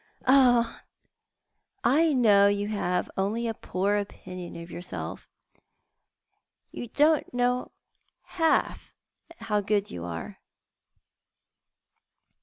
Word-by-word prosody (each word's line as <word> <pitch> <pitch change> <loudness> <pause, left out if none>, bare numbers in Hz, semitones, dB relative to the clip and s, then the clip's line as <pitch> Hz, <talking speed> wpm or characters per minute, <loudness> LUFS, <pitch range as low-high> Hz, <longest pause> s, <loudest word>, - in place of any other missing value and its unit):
" - - -26
Ah, 250 -3 +4 1.0
I 310 +6 +4
know 210 -7 +5
you 205 +1 0
have 180 -4 -1
only 215 +5 -1
a 225 - -1
poor 200 0 -1
opinion 185 -3 -7
of 170 +1 -9
yourself, 175 +1 -6 1.4
you 240 - -6
don't 300 +5 +2 1.0
half 325 -3 0 0.4
know 335 - -15
how 210 -1 +1
good 205 0 0
you 85 - -6
are." 85 -1 -7
205 Hz, 95 wpm, -27 LUFS, 190-245 Hz, 1.4 s, know